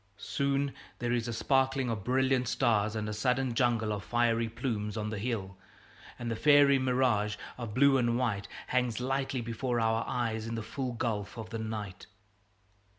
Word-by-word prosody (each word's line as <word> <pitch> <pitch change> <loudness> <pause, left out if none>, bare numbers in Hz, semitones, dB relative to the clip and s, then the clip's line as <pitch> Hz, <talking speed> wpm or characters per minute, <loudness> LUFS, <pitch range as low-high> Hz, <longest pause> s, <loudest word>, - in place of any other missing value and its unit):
Soon 140 +2 -1 0.2
there 120 0 -2
is 120 -1 0
a - - -2
sparkling 135 +2 +1
of 105 -4 -3
brilliant 130 +1 +2
stars 105 -1 +1
and 110 -1 -2
a 105 - -3
sudden 125 +4 0
jungle 115 -3 +1
of 100 -2 -4
fiery 115 +2 +1
plumes 110 -3 -3
on 105 0 -2
the 105 - -3
hill; 100 -4 -3 0.6
and 120 -1 -4
a - - -1
fairy 145 +1 +6
mirage 125 -5 +1 0.2
of 115 -4 -6
blue 140 +1 +5
and 120 -1 +2
white 110 -6 -1 0.2
hangs 125 -3 0
lightly 135 0 -1
before 120 +1 -2
our 110 0 +1
eyes 115 -2 -2
in 115 - -3
the 115 - -3
full 130 +2 -4
gulf 115 -3 -3
of 110 0 -7
night. 110 -4 -5
120 Hz, 170 wpm, -30 LUFS, 110-130 Hz, 0.6 s, fairy